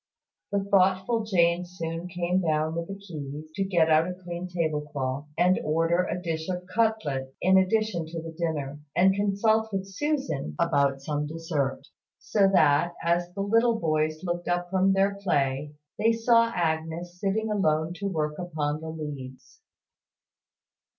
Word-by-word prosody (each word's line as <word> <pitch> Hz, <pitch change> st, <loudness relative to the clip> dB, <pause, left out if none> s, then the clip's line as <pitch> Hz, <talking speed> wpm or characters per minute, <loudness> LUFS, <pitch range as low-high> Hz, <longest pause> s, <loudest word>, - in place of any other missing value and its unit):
The 200 Hz, -1 st, +1 dB
thoughtful 195 Hz, +3 st, +2 dB
Jane 175 Hz, -3 st, +3 dB
soon 170 Hz, -1 st, -5 dB
came 180 Hz, +1 st, 0 dB
down 155 Hz, -1 st, 0 dB
with 170 Hz, 0 st, -3 dB
the 195 Hz, -, -5 dB
keys 155 Hz, -6 st, -8 dB
to 195 Hz, -, -1 dB
get 175 Hz, -4 st, +2 dB
out 160 Hz, +1 st, +4 dB
a 180 Hz, -, -5 dB
clean 180 Hz, 0 st, -6 dB
tablecloth, 150 Hz, -5 st, -2 dB
and 180 Hz, +2 st, +4 dB
order 165 Hz, +3 st, +2 dB
a -, -, -2 dB
dish 165 Hz, -1 st, -3 dB
of 180 Hz, 0 st, -3 dB
cutlets, 185 Hz, -10 st, 0 dB
in 190 Hz, +1 st, +5 dB
addition 190 Hz, -3 st, 0 dB
to 165 Hz, +1 st, -5 dB
the 165 Hz, 0 st, -7 dB
dinner, 155 Hz, -4 st, -3 dB, 0.2 s
and 190 Hz, +2 st, +5 dB
consult 215 Hz, +2 st, +1 dB
with 195 Hz, -1 st, -2 dB
Susan 195 Hz, -, -2 dB
about 140 Hz, -1 st, +2 dB
some 150 Hz, 0 st, -2 dB
dessert; 155 Hz, -4 st, -2 dB, 0.3 s
so 200 Hz, -2 st, +2 dB
that, 160 Hz, -1 st, +4 dB
as 175 Hz, +1 st, +1 dB
the 200 Hz, -, -2 dB
little 230 Hz, +3 st, +3 dB
boys 155 Hz, 0 st, 0 dB
looked 175 Hz, -1 st, -3 dB
up 175 Hz, 0 st, -1 dB
from 190 Hz, 0 st, +3 dB
their 200 Hz, +1 st, +1 dB
play, 145 Hz, -4 st, 0 dB, 0.2 s
they 225 Hz, +2 st, +4 dB
saw 230 Hz, 0 st, +4 dB
Agnes 165 Hz, 0 st, -2 dB
sitting 215 Hz, +3 st, 0 dB
alone 160 Hz, -5 st, +1 dB
at 200 Hz, +2 st, -3 dB
work 150 Hz, -3 st, -2 dB
upon 155 Hz, -4 st, -2 dB
the 160 Hz, -, -6 dB
leads. 145 Hz, -5 st, -8 dB
175 Hz, 155 wpm, -27 LUFS, 155-195 Hz, 0.3 s, in